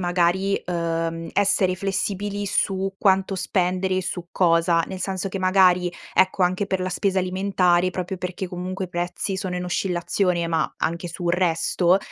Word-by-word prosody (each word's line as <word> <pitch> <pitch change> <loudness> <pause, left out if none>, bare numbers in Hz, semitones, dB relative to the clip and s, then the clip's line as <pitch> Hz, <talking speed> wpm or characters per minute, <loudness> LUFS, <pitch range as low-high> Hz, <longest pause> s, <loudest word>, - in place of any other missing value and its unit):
magari, 180 +2 +1
uhm, 165 -1 -2
essere 200 -2 +2
flessibili 200 +1 -2
su 195 -1 0
quanto 195 -1 +2
spendere 185 0 0
e - - -2
su 175 -1 -4
cosa. 170 -1 +3
Nel 190 - -6
senso 190 +1 -3
che, 195 - -4
magari, 185 -1 +4 0.2
ecco, 185 0 +3
anche 185 +3 +1
per 190 -2 -1
la 185 - -1
spesa 190 +1 0
alimentare 185 -1 +2
proprio 185 +1 -4
perché, 185 +1 -5
comunque, 185 +1 -4
i - - -18
prezzi 175 +2 -3
sono 185 -1 -3
in 180 - -3
oscillazione, 180 -1 0
ma 165 -2 0
anche 170 +2 -2
sul 170 +1 -3
resto, 180 +1 +2
185 Hz, 160 wpm, -23 LUFS, 175-190 Hz, 0.2 s, magari